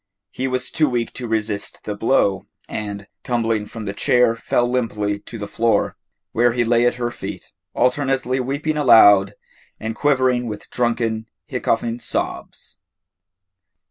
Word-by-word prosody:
He 130 - -2
was 130 -1 -2
too 155 -3 +2
weak 120 -2 -2
to 125 - -6
resist 110 -2 -3
the 105 - -4
blow, 100 -3 +1 0.2
and, 100 -1 -5 0.2
tumbling 115 -3 0
from 110 -1 -7
the 100 - -3
chair, 120 +2 +3
fell 120 +1 0
limply 105 -5 -1
to 115 - -10
the 105 - -5
floor, 115 +3 +1 0.4
where 120 +1 +3
he 120 0 +1
lay 120 +1 +3
at - - +1
her 120 -1 -2
feet, - - -8 0.2
alternately 130 0 +1
weeping 140 +4 -2
aloud 100 -8 +6 0.4
and 110 +1 -3
quivering 130 -4 +2
with 105 -2 -7
drunken, 115 -2 -1 0.2
hiccoughing 115 +1 -1
sobs. - - -5
120 Hz, 140 wpm, -21 LUFS, 110-125 Hz, 0.4 s, aloud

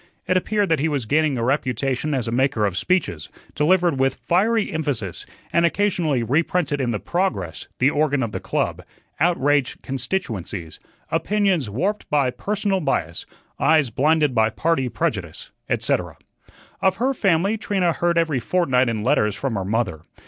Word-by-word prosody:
It 185 - +1
appeared 205 +2 +1
that 160 -3 +2
he 155 - +1
was 140 -6 -1
gaining 150 +2 +2
a 115 - -1
reputation 130 +2 0
as 125 -3 -1
a - - -2
maker 130 -3 +1
of 100 -3 -1
speeches, 95 - -1 0.2
delivered 170 -1 +2
with 135 0 +2
fiery 215 +5 +1
emphasis, 140 - -3 0.3
and 170 - +3
occasionally 170 - +1
reprinted 145 +3 0
in 125 - 0
the 115 - 0
"Progress," 95 - -2
the 135 +3 +3
organ 145 -3 +1
of 115 - -3
the - - -4
club - - -2 0.4
"outraged 145 -5 +1
constituencies," 115 - -4 0.3
"opinions 195 - +1
warped 190 - -2
by 140 -4 +2
personal 200 +3 -1
bias," 85 - -2 0.3
"eyes 155 -6 +3
blinded 150 +3 +2
by 110 -2 +3
party 135 +2 0
prejudice," 115 - -3 0.2
etc. - - -1 0.6
Of 190 0 +3
her 255 +7 0
family, 195 -2 +2
Trina 195 -5 0
heard 170 +1 0
every 160 -5 +2
fortnight 130 -3 +1
in 110 -2 -2
letters 105 -1 +2
from 135 -3 -2
her 100 -3 -2
mother. 100 -5 -1
145 Hz, 155 wpm, -22 LUFS, 120-175 Hz, 0.6 s, and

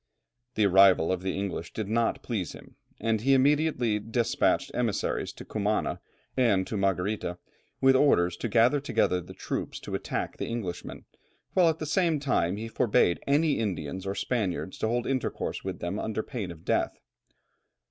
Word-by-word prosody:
The 105 - +3
arrival 95 -3 +6
of 95 -1 -1
the 95 0 -2
English 95 -4 -4
did 110 -3 -3
not 115 +2 0
please 100 - -3
him, - - -14 0.2
and 110 -1 0
he 135 +3 +4
immediately 135 -5 +2
despatched 115 +2 0
emissaries 120 -4 -1
to - - -10
Cumana 105 0 -1 0.3
and 110 -8 +3
to 110 - -5
Margarita, 95 -1 -1 0.4
with 135 0 +6
orders 90 -11 +4
to 120 - -3
gather 120 +6 +4
together 90 -10 +1
the 85 - -12
troops - - -4
to - - -7
attack - - -3
the - - -3
Englishmen, 110 -7 -5 0.5
while 180 -3 +5
at 160 - -1
the 155 - -4
same 165 -1 +1
time 100 -9 0
he 110 +2 -5
forbade 105 -6 +2
any 145 0 +3
Indians 95 -3 -3
or 95 - -2
Spaniards 95 -6 -2
to - - 0
hold 120 +1 0
intercourse 135 -1 -2
with - - -5
them 85 +5 -2
under 110 0 -2
pain 115 -9 -5
of 80 -2 -11
death. - - 0
110 Hz, 170 wpm, -28 LUFS, 95-130 Hz, 0.5 s, arrival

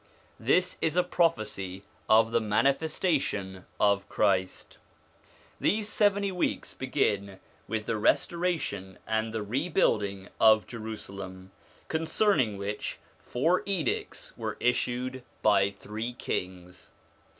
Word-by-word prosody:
This 180 +10 +2
is 160 0 +1
a 180 - +4
prophecy 105 - 0 0.3
of 110 +1 +5
the 115 - +2
manifestation 135 - 0
of 100 -1 +2
Christ. 95 -3 0 0.8
These 210 0 +1
seventy 200 -2 +2
weeks 180 - -1
begin 100 -8 -1 0.3
with 110 -1 -2
the 110 - -1
restora 170 +9 +2
tion 95 -5 -6
and 110 0 0
the 110 -1 -3
rebuilding 105 - 0
of 110 -1 +6
Jerusalem, 100 -5 -7 0.4
concerning 160 - +1
which 100 +1 -4 0.2
four 165 +9 +1
edicts 180 -10 -2
were - - -4
issued 125 +1 0 0.2
by 100 -2 +5
three 105 +4 -6
kings. 90 -5 -5
110 Hz, 105 wpm, -29 LUFS, 100-155 Hz, 0.8 s, of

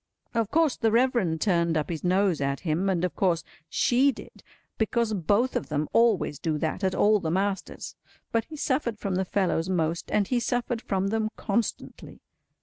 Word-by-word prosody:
Of 230 -3 0
course 320 -2 +2
the 225 - +2
Reverend 230 -9 +2
turned 170 -4 +2
up 155 +2 -2
his 160 - -5
nose 185 -3 +2
at 140 0 -1
him, 175 +3 0
and 180 -2 +1
of 180 - -4
course 170 -4 +1 0.3
she 260 +3 +3
did—because 230 -2 -4
both 205 +7 +1
of - - -2
them 150 0 -1
always 225 - +2
do 155 -2 -1
that 160 +5 -2
at 190 -1 +1
all 210 0 +4
the 165 - -3
masters—but 195 +4 -3
he 315 - -10
suffered 260 -6 -1
from 200 -2 -3
the 190 +1 0
fellows 185 -3 0
most, 165 -2 -1
and 205 -2 +1
he 250 - +1
suffered 240 -1 -1
from 195 -2 -1
them 220 0 0
constantly. 220 +2 -3
195 Hz, 175 wpm, -26 LUFS, 170-230 Hz, 0.3 s, all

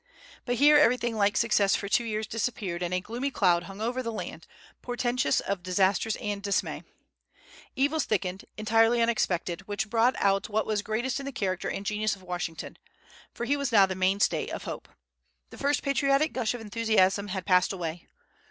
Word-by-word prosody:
But 245 - 0
here 295 +4 +6
everything 240 -4 +2
like 205 -1 +2
success 205 -4 +3
for 200 - -3
two 225 +4 +2
years 215 -1 -2
disappeared, 215 -7 -3
and 175 0 -2
a 180 - +1
gloomy 240 +7 -3
cloud 175 -8 +2
hung 195 +2 -9
over 245 +3 -1
the 230 -2 -4
land, 220 - -7 0.3
portentous 245 - 0
of 195 -2 -3
disasters 190 +3 +1
and 205 -1 -4
dismay. 200 0 -1 0.9
Evils 285 +3 +1
thickened, 190 -2 -2
entirely 225 +2 +3
unexpected, 190 -6 0
which 205 +1 -3
brought 235 +2 +3
out 195 +1 +1
what 215 +1 0
was 210 -1 -1
greatest 235 +6 -2
in 275 - -6
the - - -3
character 190 -8 -2
and 195 - -5
genius 215 0 0
of 190 - -18
Washington; 175 -2 -5 0.5
for 240 - -5
he 270 - +1
now 290 - -1
was 280 -2 -1
the 195 -5 +4
mainstay 190 +2 +1
of - - -5
hope. - - -7 0.6
The - - -12
first 285 +1 +1
patriotic 275 +2 +2
gush 245 -2 -1
of 240 - -7
enthusiasm 210 -3 +1
had 190 -1 -4
passed 180 -2 +3
away. 170 -3 -5
215 Hz, 180 wpm, -27 LUFS, 190-240 Hz, 0.9 s, here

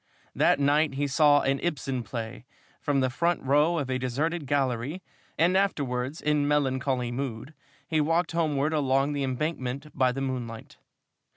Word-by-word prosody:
That - - +3
night 145 0 +2
he 145 +1 0
saw 145 +1 +4
an 135 +1 0
Ibsen 135 -6 -2
play 115 0 -6 0.4
from 140 -2 +1
the 130 - +2
front 170 +5 0
row 150 +5 +3
of 145 -4 -1
a 130 0 -1
deserted 145 +5 -2
gallery, 135 +4 -1 0.3
and 175 +3 +3
afterwards, 140 -7 0
in 150 -1 +1
melancholy 130 -3 0
mood, 130 +2 -5 0.3
he 155 -1 +1
walked 165 +3 +1
homeward 155 -3 0
along 135 -1 +1
the 145 - -2
Embankment 135 +1 -3
by 130 -2 +3
the 130 - -4
moonlight. 125 -4 -5
140 Hz, 155 wpm, -27 LUFS, 130-150 Hz, 0.4 s, saw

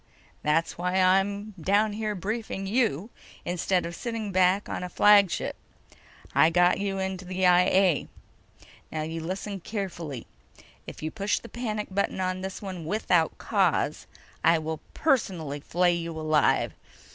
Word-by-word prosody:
"That's 165 +3 0
why 180 +1 -1
I'm 195 +3 +2
down 205 +5 +2
here 215 0 -2
briefing 205 +1 -4
you 215 - 0 0.3
instead 180 +1 0
of 170 0 -5
sitting 230 -2 -4
back 185 +2 +3
on - - -4
a 180 - -4
flagship. 205 -1 +4 0.8
I 160 - +5
got 175 +2 +3
you 195 -1 -2
into 190 -1 -3
the 185 0 -1
I 180 0 +6
A. 185 -5 +3 0.8
Now, 155 -1 -2
you 165 +1 -4
listen 195 +4 -4
carefully: 170 - -5 0.6
If - - -9
you 155 - -2
push 205 -1 0
the 235 - -9
panic 215 -3 -4
button 195 0 -1
on 185 0 -1
this 190 +2 -6
one 185 -4 -6
without 175 -3 +1
cause, - - 0 0.4
I 165 - +5
will 160 0 -4 0.2
personally 180 - 0
flay 175 +4 +2
you 165 -1 -4
alive. 155 -1 +2
185 Hz, 145 wpm, -27 LUFS, 170-205 Hz, 0.8 s, I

